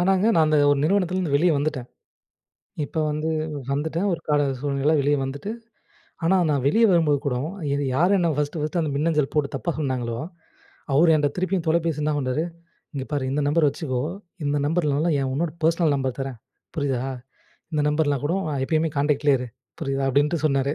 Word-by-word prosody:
ஆனாங்க 190 Hz, +2 st, +3 dB
நான் 160 Hz, -2 st, +4 dB
அந்த 155 Hz, 0 st, +3 dB
ஒரு 145 Hz, -, +3 dB
நிறுவனத்துலருந்து 185 Hz, -3 st, +1 dB
வெளியே 170 Hz, +3 st, +3 dB
வந்துட்டேன். 140 Hz, -4 st, -2 dB, 1.0 s
இப்ப 160 Hz, -, -8 dB
வந்து 155 Hz, +1 st, -2 dB, 0.4 s
வந்துட்டேன் 160 Hz, +7 st, -1 dB
ஒரு 170 Hz, -, -1 dB
கால 150 Hz, -1 st, +3 dB, 0.2 s
சூழ்நிலையில 140 Hz, +2 st, +1 dB
வெளியே 145 Hz, +1 st, +2 dB
வந்துட்டு, 140 Hz, +9 st, -4 dB, 0.7 s
ஆனா 190 Hz, +3 st, +4 dB
நான் 140 Hz, -3 st, 0 dB
வெளியே 225 Hz, +11 st, +5 dB
வரும்போது 160 Hz, -5 st, +3 dB
கூட 125 Hz, -3 st, 0 dB, 0.4 s
இது 145 Hz, -, -1 dB
யார் 180 Hz, +6 st, +4 dB
என்ன 170 Hz, -2 st, +2 dB
ஃபர்ஸ்ட்டு, 150 Hz, +2 st, -2 dB
ஃபர்ஸ்ட்டு 155 Hz, +3 st, -1 dB
அந்த 155 Hz, -, -1 dB
மின்னஞ்சல் 150 Hz, -1 st, +1 dB
போட்டு 150 Hz, -2 st, +1 dB
தப்பா 170 Hz, -, -2 dB
சொன்னாங்களோ, 125 Hz, -5 st, -2 dB, 0.8 s
அவர் 160 Hz, +3 st, +5 dB
என்கிட்ட 145 Hz, -2 st, +2 dB
திருப்பியும் 185 Hz, -1 st, -1 dB
தொலைபேசியில 160 Hz, -2 st, +1 dB
என்ன 150 Hz, -, +1 dB
பண்ணார், 130 Hz, +2 st, -1 dB, 0.5 s
இங்கே 135 Hz, -2 st, -4 dB
பாரு 145 Hz, -2 st, -1 dB
"இந்த 145 Hz, +2 st, 0 dB
நம்பர் 150 Hz, +1 st, +3 dB
வச்சுக்கோ. 130 Hz, -3 st, -3 dB, 0.4 s
இந்த 145 Hz, +1 st, +1 dB
நம்பர் 165 Hz, +2 st, +1 dB
இல்லன்னா, 150 Hz, +4 st, +1 dB
இன்னொரு 140 Hz, +4 st, -1 dB
பர்ஸ்னல் 165 Hz, -1 st, +3 dB
நம்பர் 130 Hz, -2 st, -2 dB
தர்றேன் 135 Hz, -3 st, -4 dB, 0.4 s
புரியுதா? 135 Hz, -4 st, 0 dB, 0.7 s
இந்த 150 Hz, -1 st, +1 dB
நம்பர்லாம் 150 Hz, -2 st, +1 dB
கூட 165 Hz, -, 0 dB, 0.3 s
எப்பயுமே 160 Hz, +3 st, +1 dB
காண்டக்ட்லயே 145 Hz, -1 st, +3 dB
இரு. 125 Hz, -, -5 dB, 0.3 s
புரியுதா?" 135 Hz, -3 st, -1 dB
அப்டின்ட்டு 145 Hz, +4 st, +1 dB
சொன்னாரு. 140 Hz, -1 st, +1 dB
150 Hz, 170 wpm, -24 LUFS, 140-165 Hz, 1.0 s, வெளியே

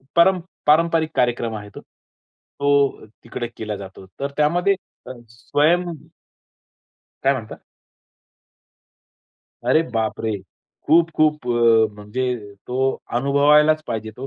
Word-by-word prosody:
पर 170 Hz, +2 st, +6 dB, 0.3 s
पारंपरिक 160 Hz, +1 st, +3 dB
कार्यक्रम 120 Hz, -2 st, 0 dB
आहे 105 Hz, -1 st, -8 dB
तो. -, -, -8 dB
तो 140 Hz, -1 st, -3 dB, 0.2 s
तिकडे 120 Hz, 0 st, -5 dB
केला 110 Hz, -1 st, -4 dB
जातो. 95 Hz, -1 st, -10 dB
तर 140 Hz, 0 st, -3 dB
त्यामध्ये 175 Hz, +6 st, +2 dB, 0.3 s
अ, -, -, -6 dB, 0.2 s
स्वयं 150 Hz, +9 st, +1 dB, 1.4 s
काय 135 Hz, +1 st, +4 dB
म्हणता? 115 Hz, -5 st, -6 dB, 2.1 s
अरे 130 Hz, +7 st, +4 dB
बापरे! 110 Hz, 0 st, -1 dB, 0.6 s
खूप-खूप 155 Hz, -4 st, +2 dB
अ, 115 Hz, -3 st, +3 dB
म्हणजे 105 Hz, 0 st, -4 dB
तो 125 Hz, +1 st, -4 dB, 0.4 s
अनुभवायलाच 150 Hz, +4 st, +4 dB
पाहिजे 110 Hz, -1 st, -4 dB
तो. 130 Hz, +2 st, -6 dB
130 Hz, 100 wpm, -21 LUFS, 115-150 Hz, 2.1 s, पर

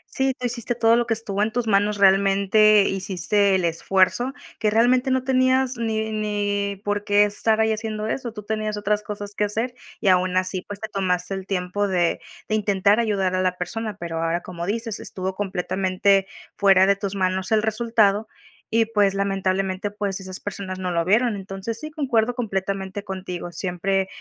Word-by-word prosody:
Sí, 265 Hz, -1 st, +1 dB
tú 250 Hz, -, -5 dB
hiciste 240 Hz, 0 st, -2 dB
todo 230 Hz, 0 st, +4 dB
lo 240 Hz, 0 st, +1 dB
que 225 Hz, -, +1 dB
estuvo 205 Hz, -2 st, -3 dB
en 215 Hz, +1 st, +1 dB
tus 245 Hz, +1 st, -1 dB
manos. 205 Hz, 0 st, +2 dB
Realmente, 200 Hz, +2 st, +5 dB
hiciste 195 Hz, +1 st, +1 dB
el 185 Hz, -2 st, +1 dB
esfuerzo, 190 Hz, +9 st, +1 dB, 0.3 s
que 215 Hz, -2 st, +2 dB
realmente 250 Hz, +4 st, +3 dB
no 260 Hz, -1 st, +1 dB
tenías 260 Hz, 0 st, +2 dB
ni 220 Hz, -1 st, -2 dB
ni 205 Hz, -2 st, -1 dB
por 205 Hz, 0 st, -1 dB
qué 205 Hz, 0 st, +4 dB
estar 215 Hz, +2 st, +1 dB
ahí 220 Hz, 0 st, +3 dB
haciendo 215 Hz, -1 st, -4 dB
eso. 235 Hz, +2 st, -3 dB
Tú 210 Hz, -1 st, -9 dB
tenías 215 Hz, 0 st, -2 dB
otras 210 Hz, 0 st, 0 dB
cosas 205 Hz, -1 st, -6 dB
que 210 Hz, -, 0 dB
hacer 225 Hz, +4 st, -2 dB, 0.3 s
y, 200 Hz, -, +3 dB
aun 185 Hz, 0 st, +3 dB
así, 185 Hz, 0 st, 0 dB
pues, 205 Hz, +1 st, -9 dB
te 220 Hz, -, -5 dB
tomaste 185 Hz, -2 st, -1 dB
el 190 Hz, 0 st, -6 dB
tiempo 195 Hz, +2 st, -1 dB
de 175 Hz, -3 st, +1 dB, 0.3 s
de -, -, -3 dB
intentar 205 Hz, 0 st, +2 dB
ayudar 195 Hz, -5 st, 0 dB
a 185 Hz, -, +1 dB
la 185 Hz, -1 st, 0 dB
persona. 215 Hz, +3 st, -4 dB
Pero 165 Hz, -1 st, -4 dB
ahora, 165 Hz, +1 st, 0 dB
como 175 Hz, -1 st, -6 dB
dices, 225 Hz, +1 st, -3 dB
estuvo 190 Hz, 0 st, -4 dB
completamente 190 Hz, 0 st, +1 dB, 0.3 s
fuera 195 Hz, -2 st, +5 dB
de 200 Hz, 0 st, +4 dB
tus 200 Hz, 0 st, -4 dB
manos 185 Hz, 0 st, -1 dB
el 215 Hz, -1 st, +3 dB
resultado 220 Hz, -1 st, +2 dB, 0.4 s
y, 225 Hz, 0 st, +3 dB
pues, 205 Hz, -3 st, +2 dB
lamentablemente, 195 Hz, 0 st, -1 dB
pues, 205 Hz, -2 st, -3 dB
esas 185 Hz, -1 st, -6 dB
personas 190 Hz, -2 st, -6 dB
no 185 Hz, -1 st, -2 dB
lo 170 Hz, -1 st, 0 dB
vieron. 220 Hz, +4 st, +3 dB
Entonces, 195 Hz, +3 st, -5 dB
sí, 305 Hz, +4 st, -6 dB
concuerdo 245 Hz, -6 st, +1 dB
completamente 195 Hz, -3 st, -3 dB
contigo. 185 Hz, -3 st, -6 dB
Siempre 190 Hz, +2 st, -1 dB
205 Hz, 185 wpm, -23 LUFS, 190-220 Hz, 0.4 s, Realmente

